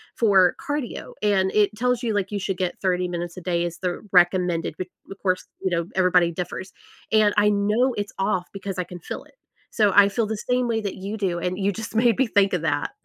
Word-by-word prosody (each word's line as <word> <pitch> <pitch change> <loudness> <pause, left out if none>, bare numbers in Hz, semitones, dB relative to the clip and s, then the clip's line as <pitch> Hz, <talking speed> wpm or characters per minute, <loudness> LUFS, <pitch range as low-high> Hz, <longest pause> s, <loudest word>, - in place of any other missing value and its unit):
for 195 -6 +4
cardio. 290 -4 -4
And 195 -2 +2
it 210 -1 +4
tells 250 +2 0
you, 230 -3 -1
like, 200 0 -1
you 205 - -2
should 195 -1 -3
get 180 -1 -2
30 180 -1 +1
minutes 175 -1 -5
a - - -6
day 170 -1 0
is 170 - -13
the 180 -1 -2
recommended. 175 -3 +3
B 185 - -2 0.2
bu - - -15
of 195 - -9
course, 185 -1 0 0.2
you 190 - +1
know, 170 -1 0
everybody 180 -2 +4
differs. 180 +2 -5 0.4
And 215 -1 +4
I 210 0 +5
know 210 +4 +2 0.2
it's 205 - -7
off 190 -2 0
because 195 -1 -5
I - - +1
can 175 - -7
feel - - -5
it. - - -26 0.4
So, 210 -3 +3
I 200 - +2
feel 225 +2 0
the 215 0 -3
same 250 -1 +2
way 225 -1 0
that 200 -2 -4
you 195 +2 -6
do, 195 -4 0
and 180 +1 -2
you 200 - +2
just 220 - -7
made 230 -1 +3
me 265 - +2
think 195 -1 +5
of 160 - -8
that. 145 -3 0
195 Hz, 240 wpm, -24 LUFS, 180-210 Hz, 0.4 s, I